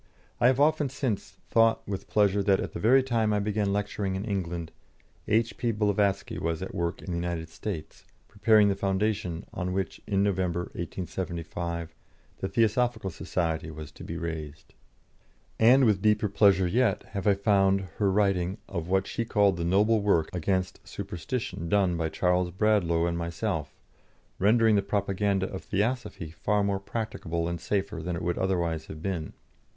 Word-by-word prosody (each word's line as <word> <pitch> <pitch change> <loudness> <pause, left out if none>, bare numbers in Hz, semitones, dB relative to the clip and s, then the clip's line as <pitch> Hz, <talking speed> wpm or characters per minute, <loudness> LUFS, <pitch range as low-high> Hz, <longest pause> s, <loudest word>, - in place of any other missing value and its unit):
I 120 - +5
have 130 +1 +3
often 150 -1 +3
since 125 -5 -3
thought 115 0 +3
with 100 -1 -4
pleasure 100 -1 +3
that 95 -1 +3
at - - -4
the - - -5
very 130 +5 +5
time 115 -4 +1
I 105 - +2
began 105 -1 0
lecturing 100 -1 -2
in 95 +3 -3
England, 85 -5 -3 0.6
H.P. 115 +2 +1
Blavatsky 100 -2 0
was 85 +1 -2
at 95 - -6
work 85 -1 -2
in 95 - -5
the 85 - -1
United 85 -1 -3
States, 85 -1 -6 0.2
preparing 105 0 +4
the 100 - +2
foundation 95 -2 -1
on 90 0 -3
which 95 0 -3
in 100 -1 +2
November, 90 -3 0
1875, 85 -1 -4 0.5
the 95 - -2
Theosophical 115 -2 +1
Society 80 -1 -2
was 75 -1 -8
to - - -12
be 85 - -5
raised. 75 -4 -6 0.9
And 125 +4 +6
with 105 -4 +3
deeper 105 0 +2
pleasure 100 -2 +4
yet 110 +2 +1
have 100 0 -3
I 100 - +5
found 100 -1 +3 0.2
her 100 -2 +2
writing 95 -2 +1
of 85 -4 -4
what 95 +1 +2
she 115 - -2
called 105 -4 +3
the 85 - -2
noble 105 +5 +3
work 90 -6 +2
against 90 +1 -1
superstition 90 -2 -5
done 95 -3 +3
by 80 -1 -1
Charles 90 +1 +1
Bradlaugh 90 -3 +2
and 85 0 -1
myself, 85 0 -3 0.6
rendering 110 +2 +4
the 100 - +3
propaganda 100 -1 0
of 95 - -6
Theosophy 105 -5 -2
far 105 +5 0
more 100 -1 0
practicable 100 -6 -3
and 85 -1 -4
safer 100 -4 -2
than 90 +2 -3
it 85 - -5
would 85 0 -1
otherwise 85 -4 -1
have 80 +1 -9
been. 85 -6 -3
95 Hz, 165 wpm, -28 LUFS, 85-105 Hz, 0.9 s, And